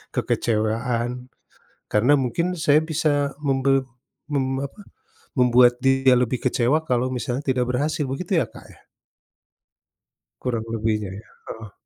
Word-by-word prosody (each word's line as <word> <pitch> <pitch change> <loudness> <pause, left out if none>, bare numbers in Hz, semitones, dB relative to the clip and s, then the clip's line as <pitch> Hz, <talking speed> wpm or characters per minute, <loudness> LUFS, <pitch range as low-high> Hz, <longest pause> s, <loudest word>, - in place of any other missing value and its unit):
kekecewaan. 120 +3 -1 0.6
Karena 120 +7 +3
mungkin 150 +8 -1
saya 155 -1 +4
bisa 145 -3 0
membel 135 -1 +2 0.5
mem 135 -1 0
apa, 140 +9 -9 0.6
membuat 125 0 +5
dia 135 -1 +4
lebih 125 +1 0
kecewa 130 +5 +2
kalau 125 -3 0
misalnya 125 +1 -2
tidak 130 -2 +1
berhasil 145 +4 0
begitu 170 +6 0
ya, - - +1
Kak, - - -14
ya? - - -17 1.6
Kurang 115 -3 -2
lebihnya 105 -3 -1
ya - - -26 0.2
heeh. 110 -3 -9
130 Hz, 120 wpm, -23 LUFS, 120-140 Hz, 1.6 s, membuat